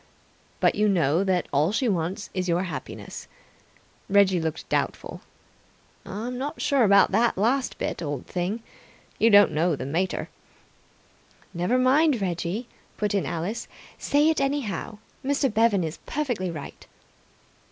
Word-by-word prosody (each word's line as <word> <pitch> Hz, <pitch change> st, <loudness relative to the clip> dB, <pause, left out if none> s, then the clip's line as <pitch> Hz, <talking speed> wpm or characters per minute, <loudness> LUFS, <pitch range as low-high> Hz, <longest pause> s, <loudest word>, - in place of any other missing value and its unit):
" -, -, -35 dB
But -, -, +4 dB
you 210 Hz, 0 st, +2 dB
know 165 Hz, -2 st, +2 dB
that 185 Hz, -3 st, 0 dB
all 150 Hz, +6 st, +3 dB
she 235 Hz, +4 st, 0 dB
wants 185 Hz, +1 st, -2 dB
is 185 Hz, -1 st, -2 dB
your 175 Hz, +2 st, +1 dB
happiness 155 Hz, -8 st, -7 dB, 0.4 s
" -, -, -33 dB
Reggie 195 Hz, -3 st, +4 dB
looked 160 Hz, 0 st, -4 dB
doubtful. -, -, -2 dB, 0.9 s
"I'm 240 Hz, +6 st, -5 dB
not 290 Hz, +4 st, -4 dB
sure 275 Hz, -3 st, +2 dB
about 200 Hz, -2 st, +5 dB
that 225 Hz, +2 st, +2 dB
last 250 Hz, +6 st, +1 dB
bit, -, -, -3 dB
old 145 Hz, -5 st, -4 dB
thing. 185 Hz, +6 st, -3 dB, 0.6 s
You 230 Hz, -, +5 dB
don't 205 Hz, -4 st, +7 dB
know 160 Hz, +2 st, +1 dB
the 130 Hz, -, -6 dB
mater!" 170 Hz, +7 st, -2 dB, 1.2 s
"Never 180 Hz, +8 st, +1 dB
mind, 265 Hz, +2 st, +4 dB
Reggie," 180 Hz, +4 st, -3 dB, 0.3 s
put 210 Hz, -1 st, -1 dB
in 200 Hz, -, 0 dB
Alice. 180 Hz, +8 st, -3 dB, 0.3 s
"Say 295 Hz, +2 st, +3 dB
it, 320 Hz, -, +1 dB
anyhow. 270 Hz, -, -2 dB, 0.3 s
Mr. 275 Hz, -3 st, +1 dB
Bevan 220 Hz, -4 st, +3 dB
is 160 Hz, -1 st, -5 dB
perfectly 245 Hz, -11 st, -2 dB
right." 155 Hz, -4 st, -8 dB
200 Hz, 145 wpm, -25 LUFS, 175-240 Hz, 1.2 s, don't